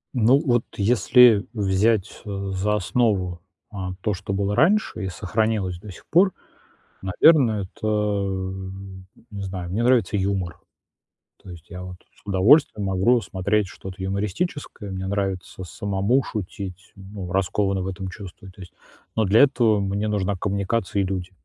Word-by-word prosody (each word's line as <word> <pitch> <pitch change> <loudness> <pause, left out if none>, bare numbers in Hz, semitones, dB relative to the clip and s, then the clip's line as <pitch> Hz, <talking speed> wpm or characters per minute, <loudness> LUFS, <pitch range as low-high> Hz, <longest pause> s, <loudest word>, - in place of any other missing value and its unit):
Ну 120 +3 +5
вот 120 -2 +2
если 110 +1 +5
взять, 100 0 +1
э, 100 -1 -4
за 105 +3 0
основу, 95 -5 0 0.3
а, 95 -2 -5
то, 105 - 0
что 95 +1 -6
было 100 +1 0
раньше 195 - +2
и - - -2
сохранилось 100 -1 -1
до 105 - -10
сих 90 - -14
пор, 185 +2 +4 0.7
наверное, 110 - +4
это, 110 - -6 1.4
не 100 -1 -6
знаю, 95 -2 -5
мне 115 +5 -1
нравится 115 -6 +3
юмор. 95 -4 -2 0.8
То 95 - -12
есть 85 -1 -12
я 90 0 -8
вот 90 0 -8 0.2
с - - -26
удовольствием 105 +2 +4
могу 95 +6 +3
смотреть 100 +2 0
что-то 95 0 -9
юмористическое. 105 - -3
Мне 95 0 -4
нравится 95 -2 -3
самому 100 +7 0
шутить, 95 -3 -7
ну, 95 -2 -8
раскованно 95 +1 0
в - - -4
этом 95 0 -5
чувствую, 95 0 -10
то 95 +1 -17
есть. 90 - -12 0.4
Но 110 - +3
для 100 +4 +4
этого 120 -7 +3
мне 100 +2 -1
нужна 100 -1 0
коммуникация 100 +1 -1
и - - 0
люди. 95 -1 -3
100 Hz, 150 wpm, -23 LUFS, 95-110 Hz, 1.4 s, Ну